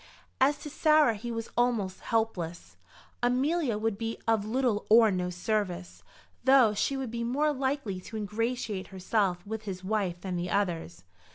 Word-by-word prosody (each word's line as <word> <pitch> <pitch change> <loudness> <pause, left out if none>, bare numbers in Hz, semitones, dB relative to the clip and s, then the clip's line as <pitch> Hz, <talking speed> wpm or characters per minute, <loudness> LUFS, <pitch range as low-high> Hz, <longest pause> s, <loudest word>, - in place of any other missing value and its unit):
As 280 +2 +4
to 295 - -6
Sarah 305 -5 +4
he 230 +3 -6
was 230 0 -5
almost 230 -6 +1
hopeless. 190 -7 -2 0.5
Amelia 255 +1 +1
would 220 -1 -1
be 225 0 -3
of 225 -2 +3
little 235 -2 0
or 220 0 +7
no 180 -1 -1
service, 180 -1 -2 0.4
though 260 -5 +6
she 270 +6 0
would 260 -4 -4
be 235 0 -3
more 290 +6 +1
likely 265 -8 -2
to 220 - -7
ingratiate 215 -1 -2
herself 190 -1 -1
with 220 +1 -5
his 190 -2 -5
wife 190 -3 -1
than 185 -2 -3
the 175 +1 -3
others. 175 - -1
220 Hz, 160 wpm, -29 LUFS, 190-245 Hz, 0.5 s, or